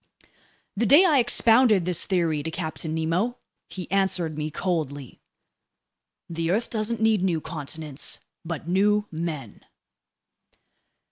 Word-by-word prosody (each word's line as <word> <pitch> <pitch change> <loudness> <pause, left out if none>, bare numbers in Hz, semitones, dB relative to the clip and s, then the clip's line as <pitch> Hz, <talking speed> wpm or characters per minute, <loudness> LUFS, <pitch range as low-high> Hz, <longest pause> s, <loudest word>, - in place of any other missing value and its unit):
The 225 +3 0
day 300 - +7
I 305 -6 +4
expounded 230 -4 +5
this 175 -2 0
theory 165 -5 0
to 160 - -4
Captain 160 -1 -4
Nemo, 175 +10 -1 0.3
he 185 -2 -7
answered 190 -5 +1
me 150 0 -3
coldly: 155 -6 -4 1.1
"The 165 0 -3
earth 215 +6 -1
doesn't 220 0 -2
need 220 -3 +3
new 180 -4 +1
continents, 155 -2 -5 0.3
but 165 -2 -6
new 205 +3 +2
men!" 160 -3 -6
175 Hz, 120 wpm, -25 LUFS, 160-210 Hz, 1.1 s, day